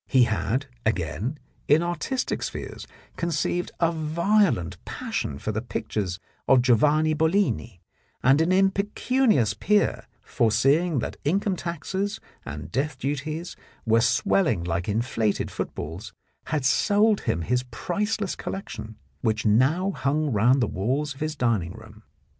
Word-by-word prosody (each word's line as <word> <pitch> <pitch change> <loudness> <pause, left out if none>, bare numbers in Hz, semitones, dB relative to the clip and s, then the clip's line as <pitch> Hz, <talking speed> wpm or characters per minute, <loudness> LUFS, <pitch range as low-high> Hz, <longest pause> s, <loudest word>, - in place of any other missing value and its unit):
He 130 -2 +5
had, 110 +5 0 0.2
again, 110 - -1 0.3
in 155 +3 +5
artistic 175 +9 -2
spheres, - - -6 0.3
conceived 170 +1 -1
a 165 -1 +3
violent 160 - +1
passion 70 - -4
for 105 - -3
the 110 +1 -2
pictures 100 -5 -3 0.3
of 130 -2 +5
Giovanni 150 +6 +4
Bollini, 160 - 0 0.4
and 135 +5 +5
an 165 +3 +2
impecunious 200 - +2
peer, 205 - +1 0.2
foreseeing 135 +9 +2
that - - -5
income 190 +6 +1
taxes 190 +5 -3 0.2
and 75 +1 -7
death 145 - -1
duties 155 +5 -3 0.3
were 115 0 +4
swelling 130 - +2
like 85 +2 -2
inflated 110 -1 0
footballs, 90 +6 -5 0.3
had 155 -4 -1
sold 205 +9 +3
him 85 - -1
his 125 +7 +1
priceless 205 - -2
collection, 110 - -6 0.3
which 110 0 0
now 135 - +3
hung 150 -3 0
round 120 +5 +4
the - - +1
walls 135 +10 -1
of 135 - -16
his 155 0 -2
dining 110 - 0
room. 110 -1 -13
140 Hz, 130 wpm, -25 LUFS, 110-175 Hz, 0.4 s, He